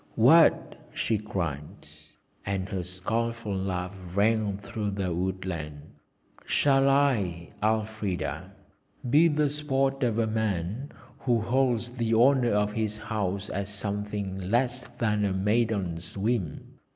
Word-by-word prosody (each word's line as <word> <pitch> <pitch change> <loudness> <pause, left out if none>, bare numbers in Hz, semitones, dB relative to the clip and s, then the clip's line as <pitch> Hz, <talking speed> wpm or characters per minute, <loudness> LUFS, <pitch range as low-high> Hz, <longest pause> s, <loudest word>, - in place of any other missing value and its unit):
'What!' - - +5
she 110 -2 0
cried, 85 -8 -5 0.6
and 95 -1 -2
her 95 -4 -2
scornful 110 +4 -2
laugh 95 -1 -3 0.2
rang 105 -1 +2
through 105 +1 -4
the 95 -3 -2
woodland, 85 -5 -4 0.5
'shall 135 -1 +3
I, 105 -12 +1
Elfrida, 110 -3 -1 0.6
be 150 +7 +6
the 150 -1 +2
sport 135 -2 0
of 120 -4 +1
a 115 - +2
man 110 - -2 0.3
who 120 -3 +2
holds 120 0 +1
the 115 -2 0
honour 125 +1 +5
of 105 0 +2
his 110 -1 -2
house 105 -2 -3
as 100 +1 -3
something 100 -2 -4
less 125 +2 +1
than 105 -3 +1
a 100 -2 +1
maiden's 100 -4 0
whim? 100 -7 -2
105 Hz, 120 wpm, -27 LUFS, 95-120 Hz, 0.6 s, be